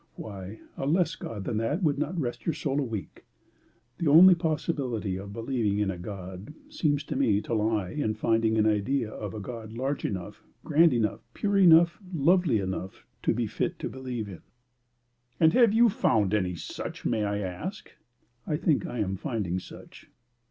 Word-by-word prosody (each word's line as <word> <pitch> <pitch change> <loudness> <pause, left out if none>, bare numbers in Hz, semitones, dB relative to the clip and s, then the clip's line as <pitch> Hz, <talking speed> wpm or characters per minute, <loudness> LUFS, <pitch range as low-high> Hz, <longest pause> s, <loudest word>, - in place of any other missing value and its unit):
Why, 100 0 -8 0.2
a 135 - -2
less 170 +4 +2
God 105 -4 -6
than 115 -1 -2
that 145 - -1
would 145 -3 +2
not 150 +5 -2
rest 120 +1 -4
your 165 - +1
soul 140 -2 -1
a - - +1
week. 110 -6 -6 0.8
The 170 - 0
only 180 +5 +9
possibility 145 - -2
of 100 +2 -7
believing 115 -2 -1
in 105 -2 +1
a 90 - -6
God 95 - -8
seems 145 -3 0
to - - -5
me 120 -7 +3
to - - -5
lie 110 -3 0
in 110 -8 -1
finding 115 -1 +1
an 110 - +3
idea 110 +3 +1
of 105 -2 -6
a - - -4
God 110 +1 -7
large 135 +4 -2
enough, 90 -4 -5 0.2
grand 160 +2 +5
enough, 110 -3 0 0.2
pure 205 -1 0
enough, 170 -1 +6
lovely 170 -4 +3
enough 95 -1 -5 0.2
to - - +2
be - - 0
fit - - -2
to - - -4
believe 125 -4 -5
in." 95 -4 -9 1.0
"And 160 -1 +5
have 240 -4 +5
you 235 +2 +5
found 105 - +2 0.2
such - - -7
may 110 -3 +1
I 100 0 -1
ask?" 105 - -5 0.6
"I 150 - 0
think 155 -3 +1
I - - -5
am 95 -3 -1
finding 95 - -2
such." - - -13
115 Hz, 180 wpm, -27 LUFS, 105-150 Hz, 1.0 s, only